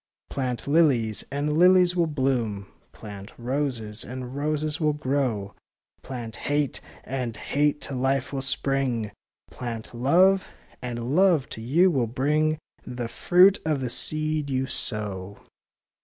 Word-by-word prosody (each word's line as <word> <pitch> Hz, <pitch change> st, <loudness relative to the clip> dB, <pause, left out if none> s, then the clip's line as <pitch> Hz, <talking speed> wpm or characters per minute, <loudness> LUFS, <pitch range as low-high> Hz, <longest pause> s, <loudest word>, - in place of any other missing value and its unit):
Plant 125 Hz, -3 st, -3 dB
lilies, 135 Hz, -, +2 dB
and 145 Hz, +2 st, -1 dB
lilies 180 Hz, 0 st, +5 dB
will 170 Hz, -2 st, +2 dB
bloom; 125 Hz, -9 st, -1 dB, 0.3 s
Plant 100 Hz, -1 st, -10 dB
roses, 120 Hz, -4 st, -2 dB
and 125 Hz, +1 st, -7 dB
roses 150 Hz, +1 st, -1 dB
will 155 Hz, -2 st, +2 dB
grow; 130 Hz, -8 st, -1 dB, 0.5 s
Plant 120 Hz, -4 st, -7 dB
hate, 145 Hz, -1 st, -1 dB, 0.2 s
and 125 Hz, -4 st, -4 dB
hate 145 Hz, +4 st, 0 dB
to 135 Hz, -, -5 dB
life 135 Hz, +1 st, 0 dB
will 135 Hz, -, -2 dB
spring; 130 Hz, -5 st, 0 dB, 0.4 s
Plant 115 Hz, -2 st, -6 dB
love, 180 Hz, +10 st, +3 dB, 0.3 s
and 120 Hz, +2 st, -3 dB
love 180 Hz, -7 st, +4 dB
to 110 Hz, -, -7 dB
you 165 Hz, +11 st, +3 dB
will 130 Hz, -7 st, +1 dB
bring 150 Hz, +6 st, +1 dB, 0.3 s
The 125 Hz, -1 st, -5 dB
fruit 185 Hz, -, +4 dB
of 155 Hz, -3 st, 0 dB
the 125 Hz, -2 st, -2 dB
seed 155 Hz, 0 st, +2 dB
you 130 Hz, 0 st, 0 dB
sow. 100 Hz, -6 st, -3 dB
135 Hz, 130 wpm, -25 LUFS, 120-150 Hz, 0.5 s, lilies